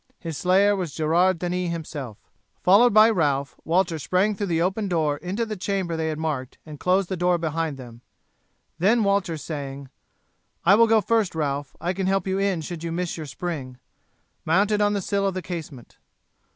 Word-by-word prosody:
His 165 -2 -6
slayer 195 +6 +3
was 175 -7 -4
Gerard 170 +4 +2
Denis 180 +1 -2
himself. 145 -9 -6 0.5
Followed 210 +7 +6
by 215 +1 +7
Ralph, 140 -7 0
Walter 170 -1 +1
sprang 185 +8 +1
through 205 0 -3
the 165 -2 0
open 195 +4 0
door 155 -5 0
into 190 +9 -3
the 215 -1 -5
chamber 190 -3 -2
they 160 0 -2
had 155 -1 -2
marked, 150 -5 -3
and 150 -2 -10
closed 185 +1 +2
the 190 - -3
door 180 0 +2
behind 160 -2 -2
them. 120 -2 -11 0.8
Then 215 +6 +3
Walter, 200 -5 +1
saying, 140 -3 -6 0.8
"I 185 - +7
will 230 +3 +6
go 225 -1 +4
first, 220 -5 +1
Ralph, 145 -3 -2
I 175 +2 -1
can 190 0 -2
help 195 -1 +1
you 190 0 -1
in 195 -4 0
should 165 +1 -7
you 165 - -3
miss 175 +1 -2
your 155 -2 -7
spring," 135 -4 -5 0.7
mounted 205 +6 +2
on 205 0 +3
the 200 - -1
sill 200 +1 0
of 190 - -2
the 185 - -2
casement. 155 -9 -8
175 Hz, 190 wpm, -24 LUFS, 155-195 Hz, 0.8 s, by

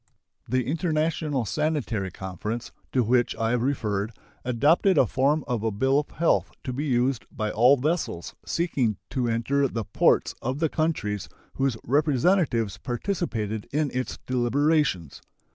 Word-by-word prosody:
The 130 0 +1
International 155 -3 0
Sanitary 135 -8 -1
Conference, 95 +6 -5 0.2
to 125 - +2
which 120 +2 +2
I 115 0 0
have 125 -1 +1
referred, 110 -5 -1 0.3
adopted 145 - +3
a - - +6
form 140 +7 +1
of 120 -4 -1
a 110 - +1
bill 130 +7 +2
of 150 - -4
health 170 - +1
to 130 - -3
be 140 +5 -2
used 125 -2 +1
by 110 -1 -2
all 125 +5 +5
vessels 150 - -2
seeking 135 - 0
to 125 -2 0
enter 125 +5 +1
the 115 -3 -3
ports - - +2
of 130 +3 -2
the 160 +1 +1
countries 145 - -1 0.2
whose 135 -4 0
representatives 140 - +2
participated 120 - -3
in 150 0 0
its 130 0 -3
deliberations. 130 - +1
130 Hz, 145 wpm, -26 LUFS, 115-150 Hz, 0.3 s, a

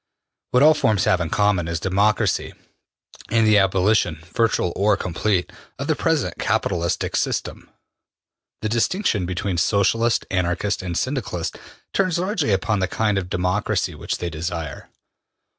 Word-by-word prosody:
What 125 +2 +4
all 155 +1 +8
forms 110 - +1
have 90 - +2
in 85 - -2
common 100 -5 +1
is 85 -1 -2
democracy 100 +4 +1 0.8
and 115 0 +3
the 105 -1 +5
abolition, 95 -4 +2
virtual 115 -7 +1
or 105 +2 +2
complete, 90 +1 -1 0.3
of - - -4
the - - +1
present - - -1
capitalistic 85 0 -1
system. - - -2 0.9
The 110 - 0
distinction 115 - 0
between 90 0 -2
Socialists, 110 +5 +2
Anarchists 90 +2 0
and 90 -2 -3
Syndicalists 105 - -2 0.4
turns 185 -3 +1
largely 180 - 0
upon 100 +2 +1
the 95 - +1
kind 105 0 0
of 90 -2 -6
democracy 90 +4 0
which - - -4
they 85 -1 -4
desire. 80 -2 -5
100 Hz, 140 wpm, -22 LUFS, 90-110 Hz, 0.9 s, all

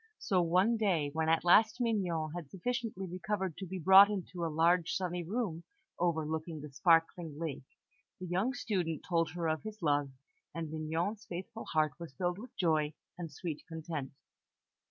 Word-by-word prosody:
So, 185 -2 +1
one 185 +7 +3
day, 175 -9 +1
when 160 0 0
at 165 0 +3
last 220 +7 +5
Mignon 180 -10 0
had 170 -5 -6
sufficiently 225 - -3
recovered 185 0 -3
to 190 - -6
be 190 +2 -5
brought 190 +4 +8
into 185 -3 -4
a - - +1
large, 165 +2 +3
sunny 180 -2 -2
room 180 -3 -2 0.4
overlooking 160 -1 -1
the 150 0 -9
sparkling 165 +1 +2
lake, 150 -4 -5 0.5
the 185 - -5
young 190 +9 0
student 180 - -2
told 165 -2 +1
her 170 -2 -2
of 155 0 0
his 215 0 -8
love, 145 -2 +2 0.5
and 165 -2 -4
Mignon's 165 +7 -2
faithful 190 +6 -6
heart 155 -2 +1
was 165 -6 -9
filled 180 +2 -1
with 245 +4 -11
joy 155 -4 +1 0.2
and 170 -2 -6
sweet 165 -5 -5
content. 160 -4 -5
170 Hz, 165 wpm, -33 LUFS, 160-190 Hz, 0.5 s, brought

